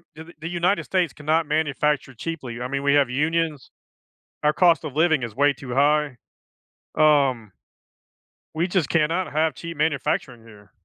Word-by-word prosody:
the 160 +2 -12
the 165 - -6
United 175 +3 0
States 180 -6 0
cannot 155 +2 0
manufacture 150 -2 0
cheaply. 125 -3 -6
I 125 - -3
mean, 140 +1 -3
we 140 0 +3
have 140 -3 +3
unions, 150 +1 -1 0.7
our 150 - +3
cost 170 -2 +3
of 145 -3 -7
living 160 -3 +2
is 115 -3 -6
way 145 +2 +3
too 130 -2 -8
high, 145 -1 +2 0.8
um 135 -8 +3 1.0
We 165 +2 0
just 175 -5 0
cannot 170 +3 0
have 155 0 +1
cheap 170 +4 -8
manufacturing 140 -5 -1
here. 105 -4 -17
150 Hz, 155 wpm, -23 LUFS, 135-165 Hz, 1.0 s, we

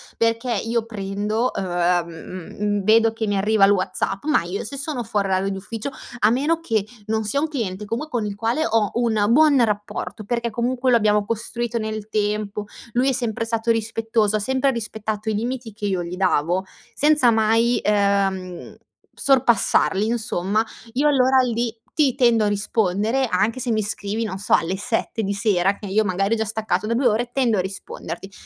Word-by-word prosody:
perché 230 +2 0
io 225 +2 -1
prendo 210 +2 -2
uhm, 175 -1 +1
mhmm, 185 +4 -4
vedo 225 +2 +4
che 225 0 -3
mi 205 -1 0
arriva 205 +1 +4
il 200 - +4
WhatsApp, 195 0 -1
ma 300 - +2
io 180 +3 -4
se 275 +6 -6
sono 280 -3 -3
fuori 200 -2 -1
orario 190 +1 +1
d'ufficio 210 +6 -5 0.3
a 210 - +4
meno 290 +8 +1
che 225 -11 -1 0.2
non 220 0 0
sia 215 +7 0
un 310 - 0
cliente, 215 -9 -4
com 230 +9 -3
con 240 -7 -2
il 200 - -5
quale 230 +8 0
ho 220 -6 +1
un 225 -3 +1
buon 285 -1 +5
rapporto, 210 0 -3
perché, 235 +2 -2
comunque, 245 +3 0
lo 240 - +6
abbiamo 210 -2 +2
costruito 235 +2 -3
nel 215 -1 -4
tempo, 210 0 -1 0.3
lui 255 +3 +2
è - - +3
sempre 235 -3 -1
stato 230 0 0
rispettoso, 225 -1 0
ha - - +1
sempre 265 +5 +1
rispettato 220 -2 -4
i - - 0
limiti 235 +1 -3
che 210 0 -6
io 185 -3 -1
gli 170 +1 -6
davo, 180 0 +1 0.3
senza 295 -5 +4
mai, 225 +2 +2
uhm, 200 -3 0 0.4
sorpassarli 240 -6 +3
insomma, 215 -2 0 0.3
io 280 +4 +2
allora 265 -2 +4
lì 235 -2 -1 0.2
ti 285 -5 +2
tendo 235 -4 +3
a - - +2
rispondere, 210 +4 0
anche 215 +6 +1
se 250 - -3
mi 220 -2 +1
scrivi 205 +2 -3
non 200 -4 -4
so 200 - -1
alle 180 +4 +2
7 225 +1 -2
di 200 0 -1
sera, 195 -2 +1
che 205 - -8
io 210 +3 +2
magari 195 +3 +1
ho - - -3
già 220 - -1
staccato 215 -2 -1
da 230 - 0
2 250 +3 0
ore, 240 +2 0
tendo 245 -5 +2
a - - +2
risponderti. 195 +1 -7
220 Hz, 185 wpm, -22 LUFS, 200-235 Hz, 0.4 s, lo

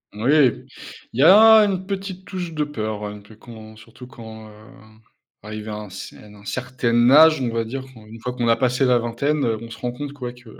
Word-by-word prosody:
Oui, 120 +7 0 0.8
il 120 - -6
y - - +5
a 220 +5 +8
une 190 -2 -3
petite 190 -1 -6
touche 180 -4 -6
de 155 - -1
peur 110 -7 -5
un 105 0 -7
peu, 105 +2 -17
quand 110 -1 -13
surtout 115 +3 -14
quand, 110 -2 -12
hem, 110 0 -18 0.4
arrivé 110 0 -8
à 105 - -5
un 105 -1 -8
c 95 - -10
à - - -16
un 105 -1 -16
certain 120 +1 0
âge, 155 +2 +7
on 125 - -1
va 115 - -1
dire, 130 +4 -6
une 110 0 -13
fois 125 +2 -5
qu'on 120 -1 -2
a 115 - +4
passé 130 +1 0
la 125 -1 +3
vingtaine, 130 +5 -1
on 115 0 -3
se - - -10
rend 125 - -4
compte 140 +3 -7
que 145 - -19
ouais 120 0 -5
que 120 -1 -17
120 Hz, 225 wpm, -21 LUFS, 110-140 Hz, 0.8 s, a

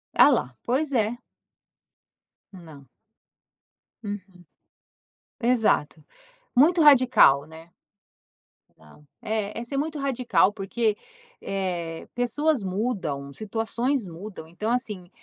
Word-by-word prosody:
Alá. 125 - +4
Pois 280 +4 0
é. 225 0 +1 1.4
Não. 160 -7 -13 1.2
Uhum. 205 -1 -4 1.2
Exato. 220 - +1 0.5
Muito 330 +6 +5
radical, 250 - +6
né? 160 +2 -14 1.1
Ah. 80 - -18 0.2
Eh. 215 0 -3
É 275 - -2
muito 300 +1 -2
radical 255 -7 +2
porque, 210 +2 -1 0.4
eh, 175 -4 -4
pessoas 250 +2 0
mudam, 185 - -3
situações 225 - -2
mudam, 175 -1 -9
então 210 +7 -3
assim, 210 -8 -3
215 Hz, 85 wpm, -25 LUFS, 170-250 Hz, 1.4 s, radical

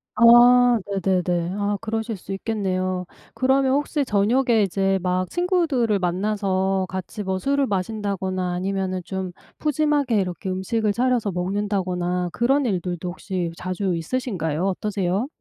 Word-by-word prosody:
아. 240 +1 +7
네네네. 185 -2 0
아 205 0 0
그러실 225 0 -3
수 190 +1 -7
있겠네요. 185 -3 -2 0.3
그러면 265 +2 +2
혹시 290 0 0
저녁에 225 +3 +2
이제 195 0 +1
막 180 0 0
친구들을 330 - +1
만나서 190 +1 0
같이 190 +3 -5
뭐 190 -1 -2
술을 280 +5 +1
마신다거나 190 -2 -2
아니면은 185 0 -2
좀 190 -1 -4 0.3
푸짐하게 295 -5 +1
이렇게 180 0 -3
음식을 205 +3 0
차려서 245 -3 +1
먹는다거나 180 -1 -1
그런 270 +6 +2
일들도 180 -3 -2
혹시 180 -1 -4
자주 185 0 -2
있으신가요? 170 - -2
어떠세요? 195 +2 -1
195 Hz, 320 characters per minute, -23 LUFS, 185-235 Hz, 0.3 s, 아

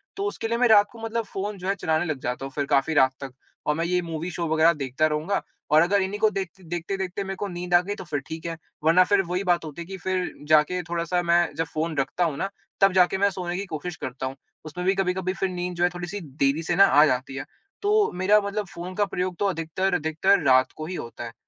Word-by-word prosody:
तो 395 - -3
उसके 320 - -3
लिए 230 +1 0
मैं 245 +1 +4
रात 205 -2 +6
को 230 - -13
मतलब 225 +1 -2
फ़ोन 200 +1 -4
जो 185 0 -6
है 195 - +1
चलाने 160 -3 0
लग 155 -5 -3
जाता 125 +2 -3
हूँ 135 - -7
फिर 145 - 0
काफ़ी 140 +3 +2
रात 130 -3 +4
तक 135 -2 -7 0.3
और 150 - +1
मैं 165 +2 -1
ये 180 +1 +1
मूवी 165 0 -4
शो 170 0 -3
वग़ैरह 160 +1 +4
देखता 140 +1 0
रहूँगा। 155 +6 -1 0.3
और 155 +1 +7
अगर 195 +4 +3
इन्ही 190 +2 -2
को 220 - +4
देखते 190 -1 -5
देखते-देखते 185 +3 -3
मेरे 195 0 -4
को 205 - -3
नींद 175 -1 -5
आ 175 - +8
गयी 200 +3 -4
तो 200 - -8
फिर 155 -5 -3
ठीक 160 +1 -7
है। 165 -1 -4 0.3
वरना 165 +4 +6
फिर 200 +1 +3
वही 180 +2 -1
बात 175 -3 +1
होती 155 +2 -7
है - - -6
कि 190 0 -6
फिर 185 -1 -2
जाके 155 +4 +4
थोड़ा-सा 170 +1 0
मैं 170 -2 +2
जब 165 +2 -1
फ़ोन 160 +1 -2
रखता 135 +6 0
हूँ 155 -4 -2
ना 195 - -2 0.3
तब 195 -1 +6
जाके 185 0 +4
मैं 200 +1 +3
सोने 180 -2 -4
की 200 - -3
कोशिश 165 -1 -5
करता 130 -4 -5
हूँ। 130 +1 -4 0.3
उसमें 175 +4 -5
भी 190 +1 +3
कभी-कभी 185 -1 0 0.2
नींद 180 0 -3
जो 170 - 0
है 175 - +4
थोड़ी-सी 175 +3 -5 0.2
देरी 140 +4 +2
से 175 +2 0
ना 195 +2 +8
आ 150 -5 +6
जाती 130 -1 -1
है। 135 - -5 0.4
तो 420 +1 +3
मेरा 205 +3 +5
मतलब 200 +1 -3
फ़ोन 175 +2 -8
का 205 - +2
प्रयोग 180 -2 -3
तो 205 - +1
अधिकतर-अधिकतर 180 +1 +1
रात 130 0 +5
को 155 - -6
ही 180 +3 -5
होता 120 -5 -7
है। 115 -1 -7
175 Hz, 255 wpm, -25 LUFS, 155-195 Hz, 0.4 s, आ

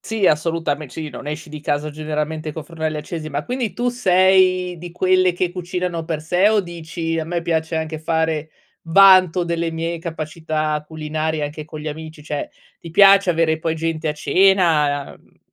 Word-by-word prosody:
Sì, 220 -3 -2
assolutame 155 -2 0
sì, 155 +4 -6
non 130 0 -9
esci 150 +2 -5
di 155 0 -8
casa 150 +1 -1
generalmente 155 +1 -4
con 160 - -6
fornelli 160 -2 -4
accesi. 155 +1 -5
Ma 145 0 -3
quindi 250 -3 -2
tu 245 +1 0
sei 185 -5 +3
di 175 +1 -9
quelle 185 0 +3
che 175 0 -1
cucinano 180 -1 -3
per 160 -2 -3
sé 180 +5 +3
o 215 -1 +3
dici: 165 -2 -4
"A 160 - -2
me 170 +1 -3
piace 160 0 -1
anche 160 0 -3
fare 160 -1 -1 0.3
vanto 185 0 +6
delle 170 -1 -2
mie 165 +1 -3
capacità 155 -2 -3
culinarie 155 0 -3
anche 150 +1 -5
con 155 0 -9
gli 155 - -4
amici", 155 0 -8
cioè 145 -1 -4 0.3
ti 165 - -10
piace 195 +1 +6
avere 160 -1 +1
poi 160 0 -1
gente 160 0 -3
a 150 - 0
cena, 150 -3 +2
uhm - - -22
160 Hz, 180 wpm, -20 LUFS, 155-180 Hz, 0.3 s, vanto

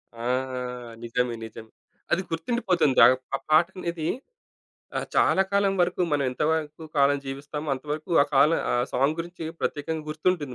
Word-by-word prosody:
ఆ! 115 - -8 0.8
నిజమే. 120 +1 -1
నిజమే. 110 0 -11 0.4
అది 185 - +3
గుర్తుండిపోతుంది. 165 - +1
ఆహ్, 125 +2 +6 0.2
ఆ - - 0
పాట 155 +2 +6
అనేది 170 -3 -3 0.9
ఆహ్, - - -3
చాలా 190 - +4
కాలం 200 -1 +3
వరకు 180 +1 +1
మనం 145 -1 +2
ఎంతవరకు 155 +3 -1
కాలం 140 0 +4
జీవిస్తామో 145 +3 -5
అంతవరకు 150 +5 -5
ఆ - - +2
కాలం 150 +4 +5
ఆ - - +2 0.2
సాంగ్ 140 +4 +2
గురించి 170 0 -6 0.2
ప్రత్యేకంగా 155 +1 -2
గుర్తుంటుంది 155 -3 -1
155 Hz, 140 wpm, -26 LUFS, 140-170 Hz, 0.9 s, ఆహ్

